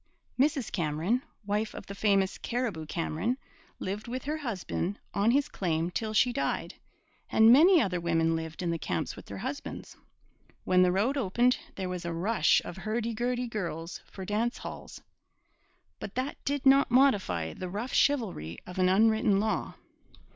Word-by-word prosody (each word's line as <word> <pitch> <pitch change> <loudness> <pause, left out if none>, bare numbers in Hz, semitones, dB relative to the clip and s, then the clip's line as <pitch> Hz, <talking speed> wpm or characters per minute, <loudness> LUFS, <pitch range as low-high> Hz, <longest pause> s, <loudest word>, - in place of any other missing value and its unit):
Mrs 275 -3 +1
Cameron, 170 +8 0 0.2
wife 210 +2 -1
of - - -8
the 200 - -7
famous 195 -2 +1
Cariboo 225 -11 -3
Cameron, 165 +9 -1 0.4
lived 200 +4 -4
with 255 +2 -4
her 300 +2 -2
husband 205 - -3 0.2
on 200 +3 +2
his 280 +4 +3
claim 170 - -1
till 220 +3 -2
she 240 +3 +3
died, 275 - -2 0.6
and 220 +2 +7
many 340 +6 +7
other 180 - 0
women 165 -1 +2
lived 160 +1 -5
in 170 - 0
the 165 - -2
camps - - -2
with - - -12
their - - -7
husbands. - - -6 0.7
When 185 0 +4
the 180 0 +5
road 220 +10 +1
opened, 245 +2 +2 0.2
there 190 -1 -3
was 180 -1 -4
a 170 -1 -3
rush 175 0 +2
of 175 - -7
hurdy 220 +3 -2
gurdy 245 +2 -1
girls 175 -7 -5
for 190 - -8
dance 220 +5 -1
halls; - - -8 1.0
but 200 - -7
that 260 +3 -3
did 285 -1 -1
not 275 +1 +6
modify 205 - +2
the 185 - -6
rough 215 +7 -4
chivalry 205 - +1
of 180 +1 -7
an 185 0 +4
unwritten 215 0 +4
law. 215 +1 -1
210 Hz, 165 wpm, -29 LUFS, 180-245 Hz, 1.0 s, and